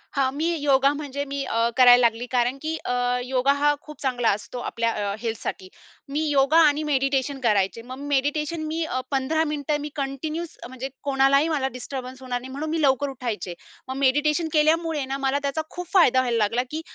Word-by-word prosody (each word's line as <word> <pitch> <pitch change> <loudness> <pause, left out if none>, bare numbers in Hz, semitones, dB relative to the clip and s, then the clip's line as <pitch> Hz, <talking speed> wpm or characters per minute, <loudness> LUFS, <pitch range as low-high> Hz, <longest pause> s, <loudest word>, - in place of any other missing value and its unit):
हां, 270 -2 +2
मी 315 +3 0
योगा 275 -1 +3
म्हणजे 285 -1 -4
मी 280 0 -3
अ, 230 -2 +1
करायला 245 -1 +8
लागली 235 0 +2
कारण 245 +1 +1
की 315 +1 -2
अ, 245 - -1 0.3
योगा 260 +1 +2
हा 295 0 +4
खूप 300 -1 -12
चांगला 245 -4 +1
असतो 210 +4 -3
आपल्या 230 0 0
अ, 205 -2 -2
हेल्थसाठी. 220 -4 -4 0.4
मी 290 +2 -1
योगा 280 +2 +3
आणि 295 +1 +1
मेडिटेशन 275 -1 0
करायचे. 210 -2 +1
मग 255 +3 -9
मेडिटेशन 295 +3 0
मी 325 +2 -2
अ, 255 -4 -2
15 280 +4 +1
मिनिटं 295 0 -1
मी 295 - -5
कंटिन्यूस 305 +4 -4
म्हणजे 260 +1 -6
कोणालाही 275 +1 +3
मला 285 -4 0
डिस्टर्बन्स 255 +1 -7
होणार 250 -1 -3
नाही, 260 +1 -9
म्हणून 295 +4 -4
मी 320 0 -1
लवकर 280 0 +2
उठायचे. 230 -9 -4 0.3
मग 260 - -4
मेडिटेशन 295 +4 +2
केल्यामुळे 315 -1 +2
ना, 270 +1 -3
मला 270 +1 0
त्याचा 280 +3 -1
खूप 355 -1 -7
फायदा 295 -10 +5
व्हायला 245 -2 +1
लागला, 230 +3 +1
की 315 +1 -3
275 Hz, 190 wpm, -24 LUFS, 250-295 Hz, 0.4 s, करायला